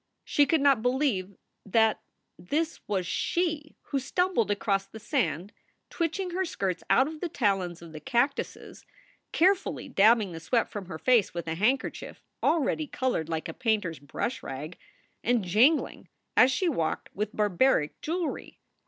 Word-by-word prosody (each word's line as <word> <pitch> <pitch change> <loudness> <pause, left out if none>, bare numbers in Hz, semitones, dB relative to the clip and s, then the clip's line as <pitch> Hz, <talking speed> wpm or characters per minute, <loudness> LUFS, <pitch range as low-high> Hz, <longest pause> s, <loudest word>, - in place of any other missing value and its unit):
She 290 -1 +3
could 320 -3 +2
not 275 -5 +4
believe 245 -7 0 0.3
that 220 +2 +2 0.3
this 305 - -2
was 190 -3 -1
she 310 - -1
who 275 - 0
stumbled 310 - 0
across 200 -1 0
the 220 - -11
sand, 200 - -1 0.4
twitching 355 +2 -2
her 375 +2 0
skirts 195 - -3
out 265 - +5
of 310 0 -7
the 355 - -2
talons 195 - -1
of 165 - -11
the 155 - -8
cactuses, 265 - -2 0.5
care 370 +4 +5
fully 390 - -6
dabbing 215 -1 +4
the 165 - -7
sweat 230 +8 0
from 205 -4 -6
her 170 -3 -6
face 235 -3 +2
with 170 -1 -4
a 160 - -1
handkerchief 220 +10 -1 0.2
already 310 -1 +1
colored 250 - -1
like 160 -1 -3
a - - -6
painter 220 -7 0
s 160 - -10
brush 145 - -4
rag, 145 +6 -6 0.5
and 240 -2 +2
jingling, 230 - +2 0.3
as 255 - +6
she 365 +7 0
walked, 170 - -2
with 210 +2 -3
barbaric 205 - +2
jewelry. 335 +1 -3
225 Hz, 160 wpm, -28 LUFS, 185-290 Hz, 0.5 s, as